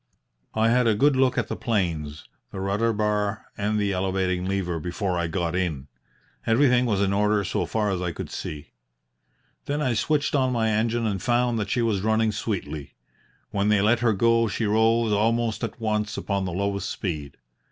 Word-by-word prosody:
"I 110 +1 +3
had 125 0 +3
a 110 - +3
good 140 +6 +3
look 130 -1 +2
at - - 0
the - - -3
planes, 80 -9 -2 0.2
the 95 - -7
rudder 100 +4 +1
bar, 105 0 -1
and 105 +1 -1
the 100 -1 +1
elevating 95 -1 -1
lever 95 -3 -1
before 90 +3 -2
I 85 -1 0
got 85 +1 -2
in. 80 -7 -2 0.6
Everything 125 +1 +4
was 100 -4 +1
in 100 0 +1
order 105 0 +2
so 95 - -1
far 105 -2 0
as 90 -2 -2
I 90 -1 -1
could - - -7
see. 75 -2 -6 0.9
Then 145 +1 -2
I 130 -5 +1
switched 145 +5 0
on 130 -3 +2
my 110 -2 +1
engine 115 +2 0
and 100 -3 -1
found 120 -1 +1
that 105 - -3
she 120 - +1
was 105 -4 +1
running 110 +1 +2
sweetly. 95 -8 -4 0.6
When 100 0 0
they 105 -2 +3
let 115 +3 +3
her 115 -2 +2
go 115 +3 +3
she 110 +2 -2
rose 110 +1 +3
almost 115 +2 +1
at 115 +1 -4
once 105 -1 -1
upon 100 -1 -1
the 90 - -3
lowest 100 +1 -2
speed. 75 -7 -4
105 Hz, 190 wpm, -25 LUFS, 95-115 Hz, 0.9 s, Everything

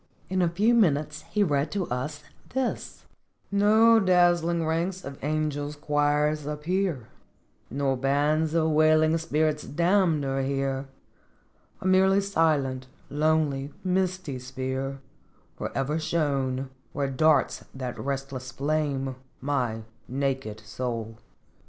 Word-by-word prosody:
In 185 -1 +1
a 175 - +3
few 205 +8 +2
minutes 155 -8 +2
he 205 +4 +2
read 145 -4 +1
to 195 -3 -1
us: 130 +4 -4
" 260 -5 -6
No 220 +3 +5
dazzling 175 -3 +3
ranks 170 +4 -1
of 140 -1 -9
angels' 150 -1 -1
choirs 150 0 +1
appear, 150 - -1 0.6
Nor 135 +1 0
bands 150 +4 +1
of 160 -1 +2
wailing 155 +1 +4
spirits 155 -1 0
damned 170 -2 +2
are 135 0 0
here, 135 0 -1 0.9
A - - -8
merely 190 +1 +5
silent, 150 -9 +1 0.2
lonely, 150 -2 +1
misty 185 -6 -1
sphere 130 +1 -4 0.5
Forever 145 +4 -2
shown, 145 -5 0
68 135 0 -5 0.2
" - - -39
Where 140 -2 -1
darts 155 +3 +2
that 130 -2 -5
restless 135 -2 -4
flame, 140 -2 -1 0.2
my 125 -5 -1 0.2
naked 130 -5 -2
soul. 115 -1 -5
150 Hz, 115 wpm, -27 LUFS, 135-170 Hz, 0.9 s, No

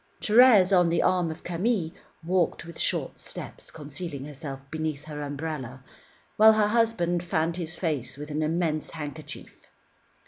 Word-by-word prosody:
Thérèse, 210 -4 +6
on 175 -2 +4
the 170 - +2
arm 180 -2 +2
of 160 - -8
Camille, 180 -1 -1 0.3
walked 175 -1 0
with 170 -1 -10
short - - -1
steps, - - -7
concealing 150 -1 -6
herself 140 -2 -7
beneath 155 -2 -3
her 150 -1 -6
umbrella, 140 -3 -5 0.5
while 220 +1 +8
her 215 -1 +2
husband 210 -7 +1
fanned 165 0 -1
his 170 -1 -5
face 140 -7 -2
with 150 +1 -7
an 150 +1 -1
immense 155 -1 -1
handkerchief. 150 -1 -8
160 Hz, 145 wpm, -27 LUFS, 150-180 Hz, 0.5 s, while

